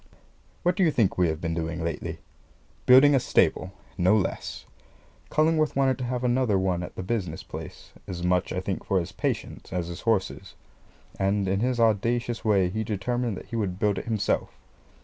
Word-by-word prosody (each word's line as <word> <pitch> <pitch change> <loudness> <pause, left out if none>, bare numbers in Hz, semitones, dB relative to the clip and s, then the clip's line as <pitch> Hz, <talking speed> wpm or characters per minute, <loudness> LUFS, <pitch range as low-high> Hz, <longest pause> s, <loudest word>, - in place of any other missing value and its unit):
What 175 0 +2
do 190 - +2
you 170 - +5
think 115 -10 +2
we 90 - +4
have 80 -1 -2
been 85 -1 -2
doing 85 0 -3
lately? 85 -2 -3 0.7
Building 135 +3 +8
a 135 - +5
stable 95 -5 +1 0.3
no 95 +5 +4
less. 100 - -3 0.6
Cullingworth 155 0 +2
wanted 135 -1 +2
to 125 - -2
have 125 0 -2
another 120 -4 +2
one 95 -2 0
at 90 - -7
the - - -5
business 90 -6 -3
place, - - -9 0.2
as 90 -1 -5
much, 90 0 +1
I 90 - -2
think, 95 0 -3
for 95 - +1
his 85 - -5
patients - - -4
as 90 -2 -2
his 85 +2 -7
horses; 100 -4 -1 0.6
and, 100 0 +1
in 95 +1 +1
his 125 +2 0
audacious 115 +2 +1
way, 100 -4 +3
he 110 +4 -2
determined 115 +1 -2
that - - -9
he - - -3
would 100 -5 -1
build 105 0 +1
it - - -8
himself. 110 -3 -1
100 Hz, 190 wpm, -26 LUFS, 90-120 Hz, 0.7 s, Building